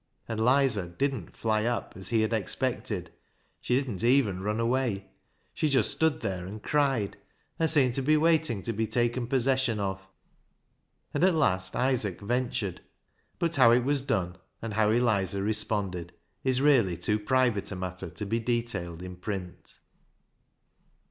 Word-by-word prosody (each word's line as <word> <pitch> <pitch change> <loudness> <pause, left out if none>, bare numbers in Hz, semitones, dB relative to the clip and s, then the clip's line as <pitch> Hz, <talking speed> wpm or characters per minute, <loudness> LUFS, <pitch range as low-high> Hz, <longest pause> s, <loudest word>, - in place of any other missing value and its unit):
And 110 -1 -3
"Lizer" 125 -5 +3
didn't 135 +10 -3
"fly 110 -1 +1
up," 120 0 -2
as 95 - -4
he 115 -2 +2
had 110 +1 0
expected; 110 -4 -2 0.5
she 125 - 0
didn't 125 -8 -2
even 120 -7 +3
run 105 +3 -1
away. 115 -5 -1 0.4
She 155 - 0
just 135 -2 +3
stood 160 -2 +1
there 95 -4 -3
and 105 +2 -8
cried, 135 -9 +1 0.4
and 160 -1 +2
seemed 135 -6 +4
to 135 - -1
be 155 +3 +3
waiting 155 - +2
to 115 - -2
be 110 +1 -1
taken 120 +2 0
possession 130 -3 +1
of. 95 -1 -2 1.1
And - - 0
at 185 -2 +4
last 95 -11 +1
Isaac 125 -8 0
ventured; 120 -3 -2 0.6
but 170 0 -1
how 115 - +7
it 120 +1 +4
was 140 +1 +1
done, 95 -10 -1 0.2
and 115 -2 -5
how 105 0 +3
Eliza 100 -5 +1
responded 100 -5 -1 0.3
is 130 -1 +1
really 120 - +4
too 105 +5 0
private 120 -2 +1
a - - -3
matter 90 0 -5
to 105 - -6
be 115 +3 0
detailed 110 -8 -2
in 90 -1 -8
print. 90 -2 -6
115 Hz, 155 wpm, -28 LUFS, 95-130 Hz, 1.1 s, how